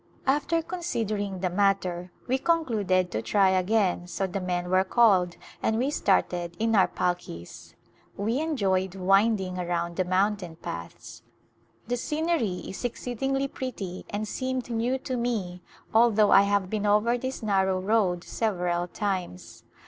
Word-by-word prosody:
After 300 +5 +1
considering 215 - -3
the 185 - +1
matter 185 -2 0 0.2
we 260 +1 +1
concluded 215 - +1
to 110 - -2
try 195 - +3
again 185 -1 +1
so 190 +2 -2
the 190 +1 -3
men 180 -1 -2
were 185 0 +4
called 190 -5 +3 0.2
and 220 - +1
we 260 +5 0
started 175 - 0
in 225 0 +1
our 195 - +5
palkis. 175 - -4 0.4
We 225 +6 0
enjoyed 195 - 0
winding 195 0 +2
around 170 -1 -2
the 185 - +2
mountain 185 -1 0
paths. 85 - -8 0.7
The 245 +1 -1
scenery 300 - -1
is 190 - -7
exceedingly 270 +3 -2
pretty 210 -10 -6
and 210 +1 -3
seemed 260 +1 -2
A - - -15
Glimpse - - -5
of - - -2
India 235 +2 0
new - - +1
to 255 -1 -4
me 205 -7 -2 0.3
although 220 -2 +5
I 195 - +8
have 200 -2 +1
been 210 +1 -1
over 210 +4 +3
this 260 0 -4
narrow 190 -3 +2
road 190 -3 +1
several 180 -5 -1
times. 185 - -4
200 Hz, 155 wpm, -27 LUFS, 180-235 Hz, 0.7 s, I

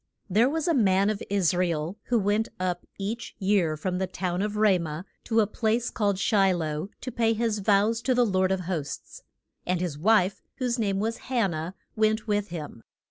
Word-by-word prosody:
THERE 225 +7 +4
was 320 +2 -1
a 335 - +3
man 200 -5 +3
of 210 - -5
Is 195 -4 +2
ra 180 +1 +2
el 165 +2 -2
who 245 - +2
went 210 +1 +1
up 180 -1 -2
each 215 +4 -4
year 190 -6 +1
from 180 +3 -2
the 190 - 0
town 180 0 -2
of 210 +1 -2
Ra 210 -4 +4
mah 160 0 -4 0.2
to 225 -1 +3
a - - +3
place 225 +3 0
called 205 -4 0
Shi 195 -1 +3
loh 155 +1 -3
to 255 - -5
pay 230 -1 +2
his 225 -1 0
vows 205 +3 +2
to 255 +1 +1
the 245 0 +4
Lord 190 -2 +1
of 190 -1 0
hosts. 165 -5 -5 0.4
And 180 -1 0
his 170 -5 -3
wife, 200 +1 +3
whose 250 -2 -1
name 200 -3 0
was 225 +2 -1
Han 235 -8 +2
nah, 160 +2 -4 0.2
went 215 0 +2
with 205 -2 0
him. 155 - -7
200 Hz, 205 wpm, -27 LUFS, 180-225 Hz, 0.4 s, THERE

